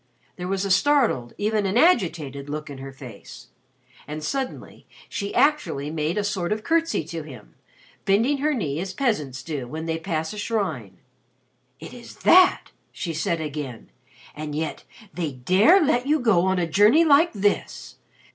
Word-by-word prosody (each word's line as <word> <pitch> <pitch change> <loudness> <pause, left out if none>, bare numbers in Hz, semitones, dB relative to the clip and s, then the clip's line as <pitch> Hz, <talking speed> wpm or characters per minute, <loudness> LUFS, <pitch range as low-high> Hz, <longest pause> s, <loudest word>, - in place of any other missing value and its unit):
There 180 0 -6
was 195 +1 -1
a 195 - -1
startled, 230 - +2
even 210 -1 0
an 195 +4 0
agitated, 165 - +1
look 150 0 -5
in 135 - -9
her 135 0 -8
face. 125 -6 -12 0.6
And 155 +1 -6
suddenly 265 - -5 0.2
she 200 0 -4
actually 285 - +1
made 160 +3 -2
a 210 - 0
sort 190 -3 -2
of 215 0 -2
curtsey 330 - +1
to 165 +1 -6
him 130 -8 -12 0.5
bending 230 +9 +2
her 300 +1 +1
knee 150 - -2
as 190 +1 -4
peasants 150 - -1
do 145 -6 -5
when 160 +5 -6
they 165 0 -2
pass 160 -1 -3
a 210 - -7
shrine. 160 - -3 0.8
"It 160 - -10
is 240 -1 -12
that!" 370 +1 +5 0.2
she 170 - -5
said 165 +1 -1
again. 145 -6 -6 0.4
"And 150 -1 -5
yet 155 0 -4 0.3
they 160 -5 -3
dare 185 - +4
let 275 -6 +1
you 305 +1 +3
go 210 -8 +3
on 190 0 +1
a 175 - +1
journey 210 - +4
like 315 +3 +5
this! 205 -1 -2
180 Hz, 165 wpm, -24 LUFS, 150-230 Hz, 0.8 s, that